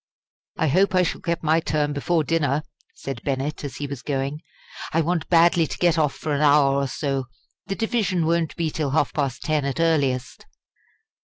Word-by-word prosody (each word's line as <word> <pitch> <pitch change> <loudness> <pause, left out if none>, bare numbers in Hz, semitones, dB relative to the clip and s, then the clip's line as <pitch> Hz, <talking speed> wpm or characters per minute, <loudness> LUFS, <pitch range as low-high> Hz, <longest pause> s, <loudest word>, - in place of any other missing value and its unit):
"I 160 - +1
hope 190 +7 +3
I 185 - +5
shall - - -3
get 170 -1 -2
my 160 +1 +3
turn 150 -2 -1
before 160 +3 0
dinner," 150 -2 0 0.3
said 135 -4 -6
Bennett, 140 +2 -3
as 140 - -5
he 145 - -4
was 140 -3 -6
going; 140 +1 -3 0.5
"I 165 - +2
want 170 0 -1
badly 170 -1 +4
to - - -6
get 170 -2 +2
off 150 -3 +1
for 155 - -3
an 145 - 0
hour 145 -2 +5
or 140 0 0
so. 135 0 -2 0.4
The 195 - -2
division 205 -7 0
won't 165 -1 0
be 165 -2 -1
till 150 -2 -2
half 145 0 +1
past 140 -4 -2
ten 155 -2 0
at 140 +3 -3
earliest." 140 -6 0
150 Hz, 190 wpm, -23 LUFS, 140-165 Hz, 0.5 s, I